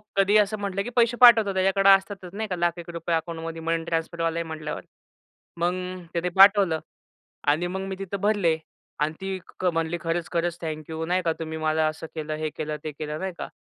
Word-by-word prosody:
कधीही 200 +2 +4
असं 210 +1 +1
म्हटलं 200 -1 -2
की 245 - -5
पैसे 235 0 +3
पाठवतो 225 -5 +8
त्याच्याकडं 195 +1 +3
असतातच 195 -1 +2
नाही 220 +1 -3
का 180 - -1
लाख 175 0 0
एक 170 0 -9
रुपये 170 0 -2
अकाऊंटमध्ये 165 0 -4
मनी 165 0 -1
ट्रान्सफरवाला 165 0 -1
आहे - - -1
म्हटल्यावर. 155 -1 -5 0.8
मग 175 +1 +1 0.4
त्याने 175 +1 -1
पाठवलं 195 -5 +6 0.7
आणि 160 +4 +3
मग 190 +2 -3
मी 190 - -4
तिथं 195 0 -5
भरले 200 -6 +2 0.4
आणि 150 +1 0
ती 190 0 -3 0.2
क - - -4
म्हणली, 165 +1 -1
"खरंच-खरंच 170 +1 -1
थँक्यू 160 0 -4
नाही 180 +1 +1
का 165 - +2
तुम्ही 160 -1 -5
मला 155 0 +1
असं 155 +1 -6
केलं, 155 0 -4
हे 155 0 -2
केलं, 150 0 -3
ते 155 - -2
केलं." 150 +1 -5
नाही 190 -1 -3
का? - - -5
170 Hz, 195 wpm, -25 LUFS, 160-195 Hz, 0.8 s, पाठवतो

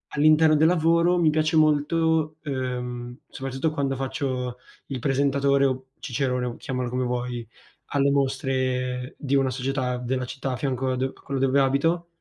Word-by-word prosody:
all'interno 155 +1 +5
del 160 +2 +5
lavoro, 170 +1 +3
mi 160 - +4
piace 155 +1 +1
molto, 155 +1 +2
uhm, 125 -3 -4
soprattutto 135 +3 -2
quando 140 -3 -1
faccio 130 -2 -3 0.3
il 135 -3 -4
presentatore 140 +1 +2
o 130 0 -1
Cicerone 125 -1 -1
o 120 - -5
chiamalo 125 -3 -3
come 125 +1 -1
vuoi, 120 -2 -3 0.4
alle 140 0 +2
mostre 130 -2 -1
di 140 -1 0
una 135 -1 +2
società 130 0 -2
della 125 +1 -2
città 135 +1 -4
a - - -1
fianco 130 0 -1
a - - 0
do 130 +1 -2
a - - -20
quello 135 -1 -3
dove 135 +1 +3
abito. 165 +6 +1
135 Hz, 160 wpm, -25 LUFS, 125-145 Hz, 0.4 s, all'interno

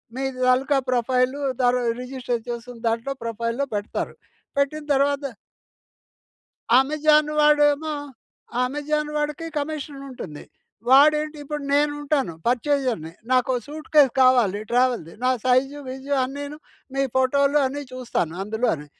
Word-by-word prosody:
మీ 265 - -3 0.2
తాలుకా 265 +3 +3
profile 255 +2 +1 0.2
తర 245 0 +4 0.3
register 250 -2 -3
చేసిన 240 0 -6
దాంట్లో 230 +4 -1
ప్రొఫైల్‌లో 230 +4 -2
పెడతారు. 205 +1 -3 0.4
పెట్టిన 280 +2 0
తర్వాత 280 +1 +1 1.6
అమెజాన్ 300 +2 +3
వాడేమో, 295 +1 +4 0.7
అమెజాన్ 295 +3 -1
వాడికి 300 +2 -2
కమిషన్ 290 -1 -5
ఉంటుంది. 175 - -8 0.4
వాడేంటి 300 +3 +5
ఇప్పుడు 295 +1 -4
నేను 290 +1 +3
ఉంటాను, 280 - 0
పర్చేజర్‍ని. 250 - 0 0.2
నాకో 255 0 +3
సూట్కేస్ 300 -2 +3
కావాలి 240 -6 +4
ట్రావెల్‌ది. 245 -9 +1
నా 255 - +4
సైజు, 260 +3 +2
విజు 265 +2 -6
అన్నీను 285 +3 -6 0.4
మీ 275 - +1
ఫోటోలు 280 +2 +3
అన్ని 285 +2 -4
చూస్తాను 240 -10 -2
అందులోని. 210 -7 -1
270 Hz, 110 wpm, -23 LUFS, 245-290 Hz, 1.6 s, వాడేంటి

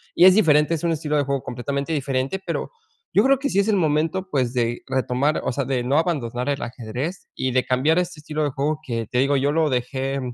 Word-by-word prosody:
y 175 - +6
es 185 0 +8
diferente, 150 -6 +4
es 165 - -2
un 170 - +1
estilo 150 -1 -1
de 145 - +2
juego 140 -1 -2
completamente 140 +5 -3
diferente, 135 +3 -1
pero, - - -3 0.4
yo - - +6
creo 270 0 +4
que 280 +1 -1
sí 200 - +1
es 200 - +2
el 215 - +3
momento, 165 +3 0
pues, 130 -6 0
de 120 -1 -1
retomar, 130 +3 0
o - - +1
sea, 140 - -1
de 130 -3 -1
no 135 +4 +1
abandonar 135 -7 -1
el 140 - -1
ajedrez 125 - -5
y 130 - -1
de 130 0 +2
cambiar 145 +7 +2
este 180 -3 -3
estilo 150 0 -3
de 145 - +1
juego 145 +3 -1
que 115 -3 -3
te 125 - -1
digo, 140 +1 +3
yo 140 +2 +1
lo 160 -1 +2
dejé, 135 +2 -2
140 Hz, 240 wpm, -23 LUFS, 130-160 Hz, 0.4 s, es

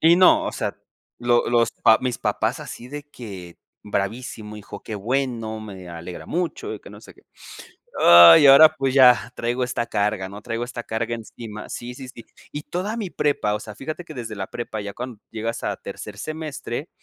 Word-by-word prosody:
Y 165 +2 +6
no, 185 0 +6
o - - -3
sea, - - -3 0.4
lo 120 0 +2
los 115 -1 +3
pa 110 - +6
mis 125 -3 -2
papás - - -1
así 120 - -9
de 145 +2 -7
que: 100 -11 -10 0.3
"Bravísimo 105 +1 -4
hijo, 105 -1 -10
qué 110 - -6
bueno, 115 0 -2
me 95 -4 -9
alegra 85 +1 -8
mucho, 175 0 -3
y - - -10
que - - -13
no - - -12
sé - - -15
qué". - - -22 0.8
Ay, 85 - +10
y 145 - +7
ahora, 155 +3 +9
pues, 135 -3 0
ya 125 -3 +5
traigo 120 +2 -1
esta 120 -1 -2
carga, 100 -2 -1
¿no?, 100 +2 -10
traigo 115 +2 -3
esta 120 -1 -6
carga 115 +1 -3
encima, 110 -1 -9
sí, 120 +1 -6
sí, 130 0 -9
sí. 120 -3 -11 0.3
Y 145 - -6
toda 190 +8 -4
mi 210 -5 -3
prepa, 145 -10 0
o 105 - -3
sea, 105 -2 -9
fíjate 155 +8 -6
que 155 - -10
desde 115 -4 -6
la 95 -1 -5
prepa 110 -2 -5
ya 100 0 -6
cuando 125 -2 -7
llegas 115 +1 -4
a - - -2
tercer 105 -1 -9
semestre, 155 -1 -5
120 Hz, 200 wpm, -23 LUFS, 105-135 Hz, 0.8 s, Ay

